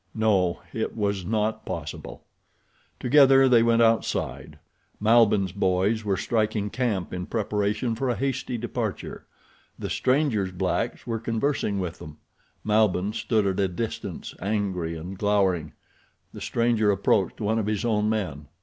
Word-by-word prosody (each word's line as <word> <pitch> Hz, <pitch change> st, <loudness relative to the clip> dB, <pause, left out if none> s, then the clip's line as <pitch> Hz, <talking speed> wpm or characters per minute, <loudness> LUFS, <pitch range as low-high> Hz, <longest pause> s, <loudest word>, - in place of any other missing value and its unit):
No, 100 Hz, -6 st, +1 dB
it 110 Hz, 0 st, -3 dB
was 100 Hz, -3 st, -1 dB
not 110 Hz, +3 st, -1 dB
possible. -, -, -6 dB, 0.8 s
Together 135 Hz, 0 st, +6 dB
they 120 Hz, -3 st, +5 dB
went 115 Hz, 0 st, +4 dB
outside. 115 Hz, 0 st, 0 dB, 0.4 s
Malbihn's 105 Hz, -3 st, +4 dB
boys 95 Hz, +3 st, +1 dB
were 100 Hz, -2 st, 0 dB
striking 110 Hz, -1 st, -1 dB
camp 110 Hz, -9 st, -2 dB
in 90 Hz, 0 st, -4 dB
preparation 105 Hz, +1 st, -1 dB
for 130 Hz, +3 st, -2 dB
a 120 Hz, -, +1 dB
hasty 130 Hz, -1 st, -2 dB
departure. 115 Hz, -2 st, -4 dB, 0.5 s
The -, -, -5 dB
stranger's 130 Hz, -8 st, +1 dB
blacks 90 Hz, 0 st, -2 dB
were 115 Hz, -2 st, -2 dB
conversing 115 Hz, -1 st, -1 dB
with 90 Hz, -2 st, -4 dB
them. 75 Hz, 0 st, -10 dB, 0.5 s
Malbihn 105 Hz, -2 st, +2 dB
stood 110 Hz, -2 st, 0 dB
at 95 Hz, 0 st, 0 dB
a 100 Hz, -, +3 dB
distance, 110 Hz, +5 st, -5 dB
angry 95 Hz, -5 st, -2 dB
and 90 Hz, +4 st, -8 dB
glowering. 95 Hz, -6 st, +1 dB, 0.6 s
The -, -, -9 dB
stranger 115 Hz, -3 st, +1 dB
approached 100 Hz, -1 st, +1 dB
one 110 Hz, +1 st, 0 dB
of 105 Hz, -, -2 dB
his 105 Hz, +1 st, -1 dB
own 105 Hz, -2 st, +1 dB
men. 90 Hz, -10 st, -3 dB
105 Hz, 140 wpm, -25 LUFS, 95-115 Hz, 0.8 s, Together